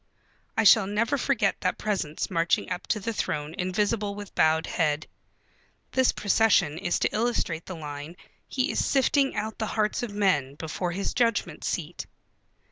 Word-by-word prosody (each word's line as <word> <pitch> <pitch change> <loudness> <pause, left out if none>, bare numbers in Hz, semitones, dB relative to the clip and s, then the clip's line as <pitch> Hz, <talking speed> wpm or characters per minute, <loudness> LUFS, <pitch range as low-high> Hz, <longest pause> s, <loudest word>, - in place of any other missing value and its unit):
I 225 - +4
shall 210 0 +7
never 220 +7 +1
forget 255 -7 +1
that 185 - 0
presence 190 -8 -2
marching 165 0 +1
up 180 - -4
to 215 - 0
the 225 +3 -3
throne 150 -6 -2
invisible 200 +2 -1
with 205 -1 -9
bowed 160 0 +3
head. 155 -2 0 0.9
This 260 -1 +3
procession 200 -6 +2
is 175 -2 0
to - - 0
illustrate 215 -8 -1
the 185 - -5
line: 150 +1 -7 0.3
"He 260 0 0
is - - 0
sifting 275 0 +2
out 220 0 -3
the 220 - -1
hearts 215 -1 +1
of 240 - -3
men 180 -10 +1
before 165 +3 -3
his 195 +3 -2
Judgment 230 -3 0
Seat." - - -3
200 Hz, 160 wpm, -27 LUFS, 165-220 Hz, 0.9 s, shall